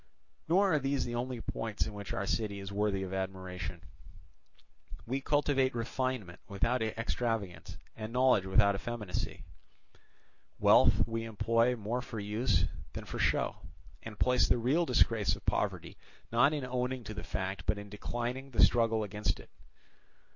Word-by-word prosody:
"Nor 190 Hz, +2 st, +4 dB
are 150 Hz, -, +4 dB
these 135 Hz, 0 st, 0 dB
the 120 Hz, -, -4 dB
only 120 Hz, 0 st, -3 dB
points 110 Hz, -2 st, -2 dB
in 110 Hz, -, -6 dB
which 100 Hz, -1 st, -6 dB
our 100 Hz, -, -2 dB
city 100 Hz, -1 st, -1 dB
is 100 Hz, 0 st, -7 dB
worthy 100 Hz, -1 st, 0 dB
of 95 Hz, 0 st, -5 dB
admiration. 95 Hz, -2 st, -4 dB, 1.2 s
We 130 Hz, +4 st, -2 dB
cultivate 135 Hz, -3 st, +2 dB
refinement 120 Hz, -5 st, -2 dB
without 115 Hz, +5 st, 0 dB
extravagance 110 Hz, -5 st, -2 dB, 0.2 s
and 110 Hz, 0 st, -6 dB
knowledge 125 Hz, -6 st, +3 dB
without 100 Hz, +1 st, +5 dB
effeminacy; 105 Hz, -6 st, -4 dB, 1.1 s
wealth -, -, +5 dB
we 115 Hz, 0 st, -2 dB
employ 115 Hz, +3 st, +2 dB
more 115 Hz, +3 st, -2 dB
for 115 Hz, -3 st, -6 dB
use 105 Hz, -3 st, +1 dB, 0.3 s
than -, -, -6 dB
for -, -, -6 dB
show, -, -, +1 dB, 0.4 s
and 110 Hz, -2 st, -9 dB
place 125 Hz, +3 st, +3 dB
the -, -, +4 dB
real 140 Hz, +9 st, +2 dB
disgrace 115 Hz, -4 st, +3 dB
of -, -, -14 dB
poverty -, -, -1 dB, 0.3 s
not 130 Hz, +5 st, +5 dB
in 145 Hz, -4 st, -2 dB
owning 125 Hz, 0 st, -2 dB
to 110 Hz, -, -6 dB
the 85 Hz, -, -6 dB
fact 95 Hz, 0 st, -4 dB
but 105 Hz, 0 st, +2 dB
in 100 Hz, 0 st, -7 dB
declining 120 Hz, +6 st, -4 dB
the 125 Hz, -, +4 dB
struggle 115 Hz, -2 st, +2 dB
against 105 Hz, +1 st, -2 dB
it. -, -, -14 dB
115 Hz, 155 wpm, -32 LUFS, 100-125 Hz, 1.2 s, without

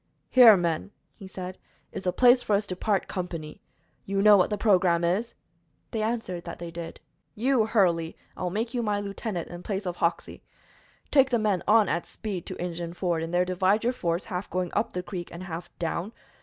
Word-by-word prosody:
"Here, 235 Hz, -5 st, +8 dB
men," 170 Hz, +1 st, -1 dB, 0.2 s
he 195 Hz, -, -11 dB
said, 185 Hz, -1 st, -7 dB, 0.3 s
"is -, -, -7 dB
the 180 Hz, -, +2 dB
place 245 Hz, +4 st, +5 dB
for 210 Hz, -, +1 dB
us 205 Hz, +1 st, 0 dB
to 185 Hz, -, -4 dB
part 200 Hz, +1 st, 0 dB
company. 165 Hz, -4 st, -6 dB, 0.4 s
You 195 Hz, 0 st, -1 dB
know 210 Hz, -1 st, +8 dB
what 185 Hz, -, +3 dB
the 210 Hz, -, -1 dB
programme 180 Hz, -5 st, +3 dB
is." 195 Hz, +8 st, 0 dB, 0.6 s
They 225 Hz, -, -2 dB
answered 215 Hz, -6 st, -2 dB
that 170 Hz, -, -6 dB
they 170 Hz, -1 st, -7 dB
did. 165 Hz, 0 st, -7 dB, 0.4 s
"You, 240 Hz, 0 st, +2 dB
Hurley, 175 Hz, -7 st, +1 dB, 0.2 s
I -, -, -10 dB
will 180 Hz, -, 0 dB
make 225 Hz, +6 st, -3 dB
my 215 Hz, -4 st, 0 dB
lieutenant 200 Hz, -2 st, -4 dB
in 175 Hz, 0 st, -8 dB
place 195 Hz, +1 st, -4 dB
of 175 Hz, -1 st, -3 dB
Hoxey. 170 Hz, 0 st, -2 dB, 0.7 s
Take 270 Hz, -2 st, +5 dB
the 245 Hz, -, +2 dB
men 210 Hz, -5 st, +1 dB
on 215 Hz, -1 st, +5 dB
at 170 Hz, -, -2 dB
speed 195 Hz, -6 st, -6 dB
to -, -, -6 dB
Injun 170 Hz, -1 st, -4 dB
Ford, 175 Hz, -3 st, -1 dB
and 165 Hz, 0 st, -4 dB
there 180 Hz, +1 st, +2 dB
divide 185 Hz, +4 st, +1 dB
your 245 Hz, +2 st, +1 dB
force, 170 Hz, -5 st, -1 dB
half 190 Hz, -2 st, -5 dB
going 180 Hz, -1 st, -2 dB
up -, -, 0 dB
the 180 Hz, -, -3 dB
creek 180 Hz, -2 st, -6 dB
and 170 Hz, +2 st, -8 dB
half 170 Hz, -1 st, -6 dB
down. 175 Hz, +5 st, -3 dB
185 Hz, 205 wpm, -27 LUFS, 175-215 Hz, 0.7 s, Here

